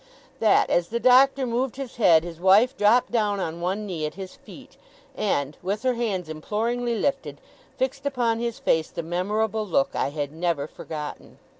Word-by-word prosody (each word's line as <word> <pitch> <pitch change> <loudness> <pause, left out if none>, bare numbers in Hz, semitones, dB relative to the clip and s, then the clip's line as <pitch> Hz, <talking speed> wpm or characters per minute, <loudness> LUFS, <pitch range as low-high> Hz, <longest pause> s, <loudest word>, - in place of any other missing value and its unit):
That, 220 - +3
as 175 -1 +2
the 235 - -2
Doctor 260 +2 +5
moved 245 +1 -1
his 270 -3 -7
head, 165 -8 +5
his 170 -1 -8
wife 205 +8 +5
dropped 225 +2 +3
down 210 -4 +1
on 170 -2 -4
one 190 +4 -2
knee 165 -6 -3
at 150 - -9
his 190 -1 -8
feet, - - -15 0.4
and, 145 -8 -1
with 200 +5 -3
her 255 -1 +2
hands 210 -8 -2
imploringly 230 +9 -2
lifted, 275 +6 -2 0.4
fixed 270 +2 -2
upon 240 -4 0
his 235 -1 -3
face 160 -1 +1
the 170 - -5
memorable 210 +6 -1
look 170 -9 +1
I - - 0
had 145 -1 -4
never 165 -2 -1
forgotten. 150 -1 -8
210 Hz, 175 wpm, -24 LUFS, 170-240 Hz, 0.4 s, Doctor